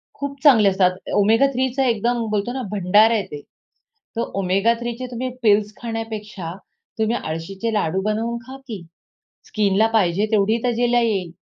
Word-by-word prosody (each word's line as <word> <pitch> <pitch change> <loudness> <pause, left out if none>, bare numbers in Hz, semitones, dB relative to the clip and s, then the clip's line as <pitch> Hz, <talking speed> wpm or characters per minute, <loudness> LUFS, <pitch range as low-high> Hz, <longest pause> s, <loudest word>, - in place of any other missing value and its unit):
खूप 280 -1 -6
चांगले 225 -9 +6
असतात, 190 -1 +3 0.3
Omega-3चं 255 +5 +2
एकदम 235 -1 0
बोलतो 210 +3 -1
ना 265 - -3
भंडार 210 +3 +4
आहे 220 -3 +1
ते. 145 - -7 0.8
तर - - +1 0.2
Omega-3 230 +6 +1
चे 255 - -4
तुम्ही 250 +2 -3
पिल्स 210 -1 +3
खाण्यापेक्षा 215 -6 -5 0.5
तुम्ही 220 +1 +1
आळशीचे 190 +6 -4
लाडू 190 -2 0
बनवून 225 +2 -1
खा 265 +1 -8
की. 215 -7 -6 0.7
स्किनला 210 0 +2
पाहिजे 195 -1 +2
तेवढी 215 +1 +2
तजेला 240 0 +2
येईल. 195 -7 -1
220 Hz, 140 wpm, -21 LUFS, 195-235 Hz, 0.8 s, चांगले